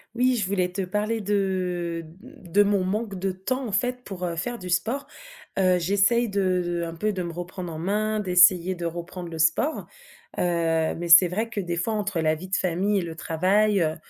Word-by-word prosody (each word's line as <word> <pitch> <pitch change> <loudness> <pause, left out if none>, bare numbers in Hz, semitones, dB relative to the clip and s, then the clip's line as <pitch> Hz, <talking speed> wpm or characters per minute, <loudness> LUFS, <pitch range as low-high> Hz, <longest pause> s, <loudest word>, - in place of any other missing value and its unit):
Oui, 255 +1 +3
je 205 -6 -1
voulais 185 -2 0
te 195 +1 -3
parler 210 +4 -2
de 180 -4 -1 0.2
de 205 - -1
mon 200 -2 +2
manque 200 +1 -2
de 190 +1 -1
temps, 255 +8 -3
en - - -5
fait, 245 +6 -1
pour, 190 -5 -7
heu, 170 -1 -3
faire 235 +8 -4
du 180 - -7
sport. 235 +11 -1 0.5
Heu, 185 -2 +3
j'essaye 200 +6 +2
de 190 -2 +1
de, 175 0 -2
un 165 0 -5
peu, 210 +5 -1
de 185 -2 -3
me 170 - -4
reprendre 175 0 -6
en 155 - -6
main, 215 +4 0
d'essayer 180 -1 +4
de 175 -1 -5
reprendre 170 +1 -6
le 165 -1 -7
sport. 165 - +1 0.5
Heu, - - +1 0.5
mais 175 +1 -5
c'est 170 +2 +8
vrai 215 +6 -2
que 225 -2 -4
des 175 -3 -3
fois 220 +6 -1
entre 205 -4 -2
la 155 -1 +2
vie 175 +4 -9
de 190 - -1
famille 190 +3 +1
et - - -2
le 165 -2 -6
travail, 190 +6 +2
heu, 160 -1 0
185 Hz, 215 wpm, -25 LUFS, 175-210 Hz, 0.5 s, c'est